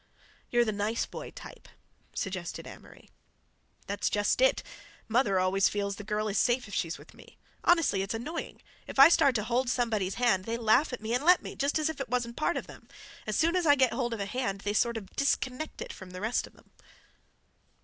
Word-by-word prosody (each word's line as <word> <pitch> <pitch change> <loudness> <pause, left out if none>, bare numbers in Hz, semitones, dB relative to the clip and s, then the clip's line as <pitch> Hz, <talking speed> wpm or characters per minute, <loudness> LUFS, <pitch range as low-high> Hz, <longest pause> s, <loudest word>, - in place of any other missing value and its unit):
"You're 240 0 +3
the 215 - 0
'nice 210 +2 -1
boy' - - -8
type," - - -12 0.5
suggested 185 -4 -4
Amory. - - -14 0.7
"That's 200 +1 -1
just 205 - +1
it. - - +3 0.4
Mother 220 -5 +2
always 185 +1 +3
feels 200 -1 -2
the 210 - -7
girl 210 +1 -2
is 200 -1 0
safe 245 -1 +1
if 200 - -11
she's 165 -2 -2
with - - -16
me. - - -17 0.3
Honestly, 330 - +3
it's 195 +3 -3
annoying. 300 +9 -6 0.2
If - - -8
I 275 +3 +10
start 280 -6 +4
to 215 - 0
hold 240 +3 0
somebody's 220 -7 0
hand, 235 -7 +2
they 230 +1 -2
laugh 235 +6 +3
at 250 - -5
me, 220 +1 -3
and 250 +3 0
let 355 +3 +5
me, - - -7
just 280 +2 0
as 310 0 +1
if 320 -3 -4
it 260 - -5
wasn't 240 -1 -1
part 330 +5 0
of - - -4
them. - - -14 0.4
As - - -1
soon 335 +2 +2
as 355 -3 +1
I 290 - +7
get 260 -3 +3
hold 240 -3 -1
of - - -9
a 200 - -2
hand 200 -3 -3
they 205 0 -2
sort 235 +2 +1
of 205 -4 -7
disconnect 275 +1 -1
it - - -8
from 190 - -11
the 185 0 -8
rest 220 +3 0
of - - -20
them." - - -23
235 Hz, 220 wpm, -29 LUFS, 205-265 Hz, 0.7 s, I